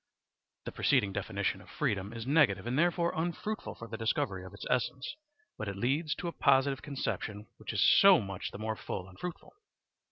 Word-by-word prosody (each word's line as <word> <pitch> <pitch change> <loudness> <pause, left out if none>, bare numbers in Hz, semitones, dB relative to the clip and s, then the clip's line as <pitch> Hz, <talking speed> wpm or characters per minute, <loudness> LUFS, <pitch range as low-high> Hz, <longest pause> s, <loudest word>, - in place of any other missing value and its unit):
The - - -4
preceding 100 -1 +2
definition - - -2
of - - -16
freedom 100 0 -1
is 115 -1 -6
negative 130 - +3
and 120 +1 -1
therefore 170 +2 +2
unfruitful 175 +6 -3
for 115 - -9
the 110 - -6
discovery 100 -4 0
of 95 - -9
its 100 - -9
essence, 125 - -1 0.4
but 110 - -3
it 100 -1 -4
leads 145 +8 0
to - - -5
a - - -1
positive 135 -1 +3
conception 110 -7 -3
which - - -6
is - - +3
so 195 -3 +8
much 95 -2 -4
the - - -9
more 110 +1 -2
full 90 -3 -5
and 95 0 -15
fruitful. 180 -2 -7
120 Hz, 190 wpm, -31 LUFS, 100-155 Hz, 0.4 s, so